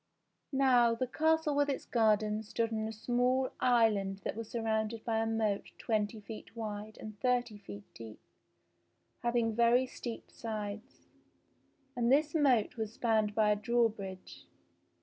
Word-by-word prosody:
Now 250 -4 +4
the 255 - -1
castle 315 +3 +1
with 285 0 +2
its 275 - -2
gardens 215 -2 +1
stood 230 -1 -1
on 220 0 -1
a - - -4
small 245 +4 +1
island 210 -5 +2
that - - -3
was 225 -1 -6
surrounded 220 -1 -2
by 225 -1 +1
a 225 - 0
moat 220 -3 -1
twenty 215 -1 -1
feet 215 -1 -10
wide 215 -1 -6
and 215 -2 -9
thirty 245 -3 0
feet 105 - -9
deep, 110 -2 -10 1.0
having 235 -1 +1
very 235 +3 +4
steep 240 -2 -7
sides. 215 +1 -6 0.9
And 240 0 +1
this 295 +2 +3
moat 260 -9 +2
was 220 -1 -3
spanned 220 -3 +1
by 215 -1 +4
a - - +3
drawbridge. 205 - -2
225 Hz, 145 wpm, -32 LUFS, 210-245 Hz, 1.0 s, Now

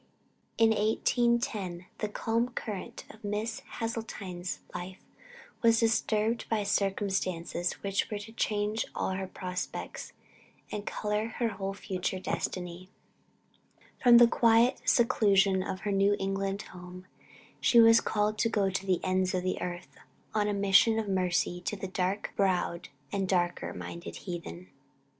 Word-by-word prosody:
In 225 -1 +5
1810, 220 -4 +1
the 210 - -2
calm 230 +3 0
current 215 -5 -6
of 220 - -18
Miss 210 +2 -2 0.2
Hasseltine's 205 -6 -4
life 180 +1 -6 0.6
was 230 -1 +5
disturbed 225 0 +1
by 220 -2 +1
circumstances 190 -3 -1
which 195 0 0
were 210 - -3
to 210 +2 -9
change 210 0 -1
all - - -1
her 190 0 -3
prospects, 180 -1 -5 0.6
and 210 0 -5
color 210 +1 -1
her 235 -2 +1
whole 195 -1 -4
future 185 -2 -3
destiny. 180 0 -4 1.1
From 240 -2 +8
the 240 0 +8
quiet 235 +2 +4
and - - -1
seclusion 200 -5 +4
of 185 0 -4
her 210 - -2
New 200 +1 +3
England 195 +1 -2
home, 180 0 -10 0.5
she 235 - +5
was 225 0 +8
called 210 0 0
to 230 - +2
go 200 -3 +1
to 195 0 -3
the 185 -2 +2
ends 185 0 +1
of 180 - -1
the 185 - -2
earth, 175 0 -6 0.3
on 210 -1 +1
a 205 - 0
mission 200 +3 +5
of 220 -2 -1
mercy 180 -2 0
to 195 - -3
the 195 -1 -5
dark 185 +2 -2
browed 180 -3 0 0.2
and 195 -1 -1
darker 175 -2 0
minded 170 0 -7
heathen. 130 - -7
200 Hz, 145 wpm, -30 LUFS, 185-220 Hz, 1.1 s, From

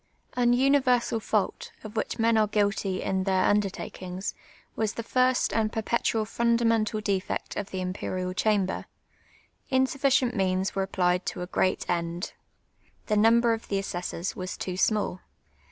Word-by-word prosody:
An 245 -1 +3
universal 255 -3 +3
fault, 475 - -1
of 215 0 -9
which 220 - -2
men 230 0 +3
are 215 -1 +4
guilty 200 -2 0
in 190 -1 0
their 190 -1 +2
under 205 -1 +3
takings, 185 0 -6 0.4
was 220 -2 -1
the 230 - -5
first 255 +2 +2
and 220 -1 +1
per])etual 220 -1 0
fundamental 230 -2 +1
defect 200 -2 -2
of 205 - -4
the 190 - -5
Imj)erial 185 0 -3
(Ihamlx^r: 200 -2 0 0.8
insufficient 260 -1 +2
means 190 -1 0
were 195 -1 -1
ap])lied 180 -1 +1
to 180 - -3
a - - -6
p^eat 185 0 0
end. 170 +1 -2 0.7
TIk, 210 -1 +2
number 230 +2 +5
of 225 - -5
the 200 - 0
assessors 180 -2 -3
was 185 0 -5
too 185 - -4
small. 205 -1 +1
210 Hz, 150 wpm, -27 LUFS, 185-230 Hz, 0.8 s, number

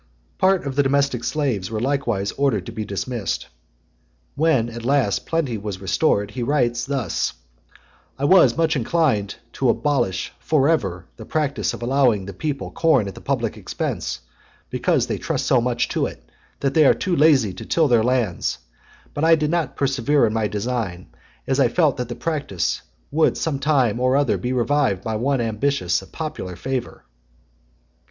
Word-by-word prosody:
Part 190 -2 +3
of 135 -2 -3
the 145 - +4
domestic 140 -3 +1
slaves 120 -8 -1
were 110 -1 -3
likewise 120 -6 -1
ordered 130 -10 0
to - - -7
be 110 - -4
dismissed. 105 - -3 0.8
When, 145 -7 +2
at 120 0 -8
last, 125 -7 +1
plenty 145 -9 -1
was 100 -2 -5
restored, 100 0 +1
he 125 - -5
writes 120 -2 +1
thus 130 - -1 0.8
"I 140 - -1
was 185 +2 +5
much 165 -1 +2
inclined 130 -6 +1 0.2
to 130 - +1
abolish 120 -9 0
for 145 -3 +2
ever 95 - 0
the - - -9
practice 140 -8 -1
of - - -8
allowing 120 -6 +2
the 100 - -7
people 145 - -4
corn 150 -11 +2
at 100 - -6
the - - -12
public - - -2
expense, - - -4 0.5
because - - +1
they - - -3
trust - - -2
so 125 - +3
much 120 0 0
to - - 0
it, - - -11 0.4
that 135 -1 0
they 155 0 +5
are - - +5
too 185 -3 -1
lazy 140 - +4
to 90 - -8
till 160 -2 +2
their 120 -4 +4
lands; 120 -8 0 0.6
but 145 - -3
I 165 0 +6
did 155 -1 -1
not 170 -2 -1
persevere 140 +1 +2
in 110 - -1
my 110 -1 +1
design, 105 -4 -3 0.4
as 135 - 0
I 135 - +5
felt 155 +4 +3
sure - - -14
that 125 -1 -4
the 120 - -4
practice 145 - -2 0.3
would 155 +2 +2
some 150 -4 -1
time 135 -6 +2
or 130 +2 +3
other 145 -1 +1
be 125 - -2
revived 125 -5 +1
by 110 - -2
some 110 - -2
one 135 0 +1
ambitious 110 -4 0
of 95 - -15
popular 150 - -5
favour." 130 +6 -4
130 Hz, 180 wpm, -22 LUFS, 110-145 Hz, 0.8 s, I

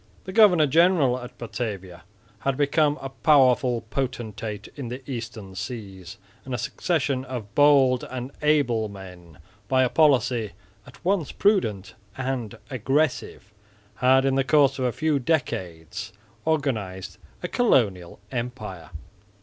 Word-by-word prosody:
The 190 - -8
governor 190 -7 +6
general 150 -4 +3
at 125 -1 -10
Batavia 100 -7 -6 0.3
had 135 +3 -1
become 145 +1 +2
a 135 - -4
powerful 130 -4 +3
potentate 110 -5 -4
in 140 -4 -6
the 125 +2 -8
Eastern 115 -6 -6
seas; 95 -4 -7 0.3
and 130 -1 -4
a - - -2
succession 135 +1 -1
of 120 -5 -7
bold 140 -4 +5
and 130 +1 -5
able 125 -8 +2
men, 90 -5 -12 0.3
by 130 +2 +3
a 125 - +2
policy 125 -8 +2 0.3
at 125 - -16
once 185 -5 +1
prudent 110 - +1 0.2
and 130 -4 -3
aggressive, 130 -4 -1 0.4
had 130 +1 +4
in 135 - +2
the 135 0 +2
course 140 -1 +3
of 130 - 0
a 125 - +1
few 155 +2 0
decades 100 - -3 0.4
organised 100 - -2 0.2
a - - -1
colonial 105 - +1
empire. 110 -9 -5
125 Hz, 130 wpm, -25 LUFS, 105-140 Hz, 0.4 s, governor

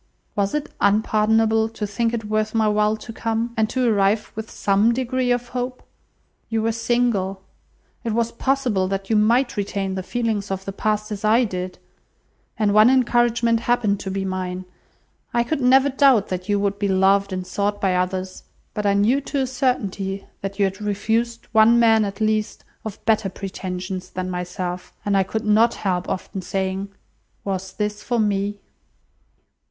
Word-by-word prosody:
Was 200 +4 0
it 300 -1 -3
unpardonable 220 +2 +3
to 220 -1 -4
think 225 +3 -1
it 230 -2 -3
worth 215 +1 -1
my 220 -1 +3
while 210 +1 +2
to 225 +1 -9
come? 225 +1 -2
and 220 0 +1
to 255 -2 +1
arrive 205 -1 +2
with 220 0 -6
some 210 +4 +2
degree 255 0 -1
of 245 0 0
hope? 250 0 -4 0.7
You 225 -1 0
were 225 - +2
single. 225 -5 0 0.6
It 230 - -2
was 230 0 0
possible 245 -7 0
that 195 +2 -3
you - - +4
might 235 +5 +3
retain 200 -1 -2
the 190 - -3
feelings 220 0 -2
of 195 0 -4
the 195 - -3
past, 215 +1 -1
as 205 -1 -5
I 225 +4 +4
did; 185 -4 -4 0.8
and 210 -2 +2
one 215 +3 +7
encouragement 240 -2 +3
happened 230 -4 +1
to 190 - -5
be 195 0 -2
mine. 185 -1 -3 0.7
I 235 - +4
could 275 +4 -2
never 265 +2 +5
doubt 265 -6 +4
that 185 +1 -4
you 205 0 +2
would 200 0 -1
be 205 - +1
loved 195 +1 +3
and 185 -1 -3
sought 205 +2 -1
by 190 -2 +1
others, 185 +1 -2 0.3
but 210 -1 -1
I 200 - +3
knew 225 +8 +3
to 275 0 -2
a - - +1
certainty 200 -7 -2 0.2
that 195 0 -5
you 200 - +3
had 195 +1 -4
refused 225 +3 -1
one 230 +1 +6
man, 225 -2 +5
at 200 0 -6
least, 215 -1 -1 0.2
of 220 -1 -8
better 220 -3 +2
pretensions 185 -1 -5
than 185 0 -4
myself; 180 0 -4
and 205 -1 +1
I 195 - +4
could 220 +4 -3
not 220 +3 +4
help 180 -3 -2
often 190 +1 -4
saying, 190 +1 -2 0.6
'Was 190 -1 -3
this 210 0 -3
for 240 - -1
me? 205 -1 0
210 Hz, 175 wpm, -22 LUFS, 195-230 Hz, 0.8 s, one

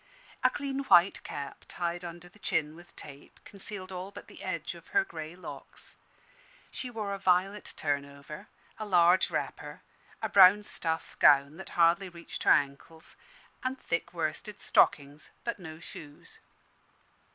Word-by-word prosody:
A 255 - +6
clean 275 0 -3
white 175 -4 +5
cap, 140 -1 -7
tied 175 0 -3
under 175 0 -8
the 195 +4 -20
chin 155 -5 -1
with 175 +1 -16
tape, 140 -1 -12
concealed 195 -1 -5
all 185 +1 -5
but 200 - -11
the - - -14
edge - - -3
of - - -14
her 400 -1 +2
grey 160 - -8
locks. 185 - -11 0.8
She 255 - -2
wore 215 -4 -4
a 200 - -5
violet 190 +2 +1
turnover, 140 0 -4 0.3
a 215 - -3
large 180 -1 +5
wrapper, - - -5 0.4
a - - -1
brown 200 +1 +7
stuff 165 -5 -2
gown 140 +2 +5
that 190 - -9
hardly 175 +3 +4
reached 170 -1 -9
her - - +4
ankles, 145 +3 0 0.5
and 260 +1 -2
thick 170 - -2
worsted 170 +6 -3
stockings, 145 0 +2
but 235 -3 -3
no 160 -3 -9
shoes. 160 -4 -12
175 Hz, 150 wpm, -30 LUFS, 155-200 Hz, 0.8 s, brown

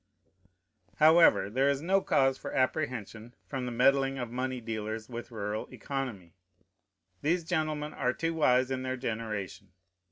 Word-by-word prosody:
However, 160 - +6
there 130 +7 +2
is 140 -1 +1
no 190 +6 +2
cause 135 -5 +2
for - - -7
apprehension 120 -4 -2
from 130 -3 -4
the - - -3
meddling 135 +2 +3
of 120 -3 -4
money 130 +1 -2
dealers 110 -1 -4
with 120 -1 -7
rural 105 -2 -4
economy. 120 - -5 0.9
These 170 +3 +1
gentlemen 155 -3 -2
are 125 -1 0
too 165 +5 -2
wise 130 -5 +3
in 130 -1 -1
their 130 0 -3
generation. 110 -5 -5
130 Hz, 140 wpm, -30 LUFS, 115-140 Hz, 0.9 s, However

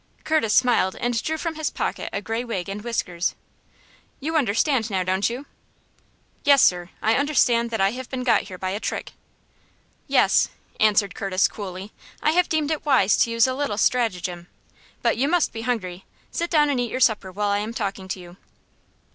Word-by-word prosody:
Curtis 310 -9 +1
smiled, 245 -7 +3
and 240 -1 -1
drew 315 0 -2
from 330 0 -3
his 315 -1 -2
pocket - - -3
a 200 - -4
gray 225 +3 -2
wig 210 -7 -4
and 200 +1 -5
whiskers. 180 -7 -2 0.8
"You 320 +4 -3
understand 245 -2 +2
now, 190 -3 0
don't 190 +3 +1
you?" 250 +5 -6 1.0
"Yes, 280 -2 +6
sir; 175 -1 +2
I 220 - +3
understand 245 -4 +2
that 225 -1 -3
I 195 +1 +3
have 255 +1 -7
been 255 -1 -4
got 240 -2 +3
here 185 -2 -9
by 185 0 -3
a 200 - -3
trick." - - -4 1.0
"Yes," - - +4 0.3
answered 205 -2 +3
Curtis, 195 -1 +1
coolly. 195 0 -7 0.3
"I 305 - +2
have 360 +2 +2
deemed 310 -1 0
it 310 - -2
wise 255 -9 +4
to - - +3
use 230 0 +3
a 260 - 0
little 260 -6 -2
stratagem. 180 -8 0 0.6
But 235 -2 +2
you 270 +4 +1
must 345 +1 +1
be 225 - -5
hungry. 195 -7 -3 0.3
Sit 340 0 -2
down 295 -3 +3
and 265 - 0
eat 245 -1 -1
your 255 - -3
supper 215 -6 +2
while 205 +2 -1
I 200 0 +1
am 215 +2 -3
talking 195 -4 -4
to 185 - -4
you." 175 0 -12
225 Hz, 190 wpm, -23 LUFS, 195-260 Hz, 1.0 s, Yes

